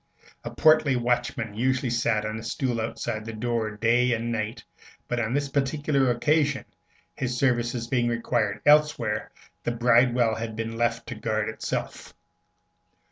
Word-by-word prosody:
A -, -, -4 dB
portly 155 Hz, -3 st, +4 dB
watchman 120 Hz, -2 st, -1 dB
usually 130 Hz, +3 st, 0 dB
sat 115 Hz, -2 st, +1 dB
on 110 Hz, +1 st, -3 dB
a -, -, -8 dB
stool 120 Hz, -1 st, -2 dB
outside 110 Hz, 0 st, -4 dB
the 115 Hz, +1 st, -7 dB
door 110 Hz, -1 st, -2 dB
day 120 Hz, +2 st, +3 dB
and 115 Hz, +1 st, -2 dB
night; 110 Hz, -1 st, -3 dB, 0.4 s
but 120 Hz, -, -1 dB
on 110 Hz, -1 st, -1 dB
this 145 Hz, 0 st, 0 dB
particular 140 Hz, 0 st, +1 dB
occasion, 145 Hz, +3 st, +1 dB, 0.5 s
his 125 Hz, -1 st, -3 dB
services 120 Hz, -2 st, 0 dB
being 120 Hz, 0 st, 0 dB
required 115 Hz, -3 st, -1 dB
elsewhere, 150 Hz, 0 st, +3 dB, 0.3 s
the -, -, -1 dB
bridewell 120 Hz, 0 st, +3 dB
had 110 Hz, 0 st, -4 dB
been 115 Hz, 0 st, -4 dB
left 115 Hz, 0 st, 0 dB
to -, -, -4 dB
guard 110 Hz, -1 st, -2 dB
itself. 110 Hz, -, -5 dB
120 Hz, 145 wpm, -26 LUFS, 115-130 Hz, 0.5 s, portly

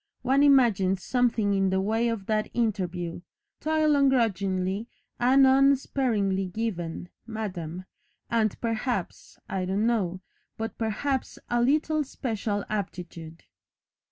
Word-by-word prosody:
One 265 Hz, +2 st, +3 dB
imagines 215 Hz, -10 st, +4 dB
something 230 Hz, -5 st, +1 dB
in 195 Hz, -1 st, +2 dB
the 190 Hz, 0 st, +1 dB
way 220 Hz, +4 st, +1 dB
of 220 Hz, -4 st, -3 dB
that 215 Hz, 0 st, 0 dB
interview, 180 Hz, -7 st, -2 dB, 0.4 s
'toil 310 Hz, -1 st, +2 dB
ungrudgingly 205 Hz, -7 st, +1 dB, 0.3 s
and 265 Hz, +3 st, +5 dB
unsparingly 260 Hz, -8 st, +2 dB
given, 180 Hz, -4 st, -4 dB, 0.2 s
Madam, 185 Hz, -6 st, -5 dB, 0.4 s
and, 220 Hz, -3 st, 0 dB
perhaps 230 Hz, -3 st, -3 dB
I 190 Hz, -1 st, -2 dB
don't 195 Hz, +4 st, 0 dB
know 195 Hz, -6 st, 0 dB, 0.4 s
but 225 Hz, 0 st, -4 dB
perhaps 245 Hz, +5 st, -2 dB
a 240 Hz, 0 st, +2 dB
little 305 Hz, +4 st, +2 dB
special 220 Hz, -6 st, -3 dB
aptitude.'" 175 Hz, -5 st, -6 dB
220 Hz, 110 wpm, -27 LUFS, 190-250 Hz, 0.4 s, and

